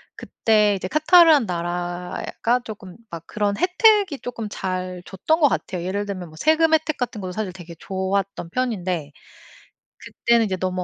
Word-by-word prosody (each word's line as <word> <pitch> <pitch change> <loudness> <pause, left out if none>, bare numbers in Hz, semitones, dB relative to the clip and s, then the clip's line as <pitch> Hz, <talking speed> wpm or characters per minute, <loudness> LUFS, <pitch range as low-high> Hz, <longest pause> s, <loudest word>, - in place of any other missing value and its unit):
그때 210 -2 +1
이제 185 -1 -4
카타르란 310 - +6
나라가 175 +7 -2
쪼끔 195 -4 -9
막 170 -1 -8
그런 205 -1 -1
혜택이 375 -3 +3
쪼끔 230 -3 -6
잘 185 -2 -4
줬던 315 - 0
거 295 - +6
같아요. 180 -8 -3
예를 200 +3 -2
들면 185 -3 -6
뭐 155 - -15
세금 320 - +3
혜택 310 -1 +1
같은 245 -4 -3
것도 185 - -5
사실 200 0 -4
되게 175 -2 -11
좋았던 190 -2 -3
편인데, 185 - -2 0.9
그때는 235 -1 +1
이제 190 -3 -2
너무 185 0 -2
200 Hz, 320 characters per minute, -22 LUFS, 180-255 Hz, 0.9 s, 카타르란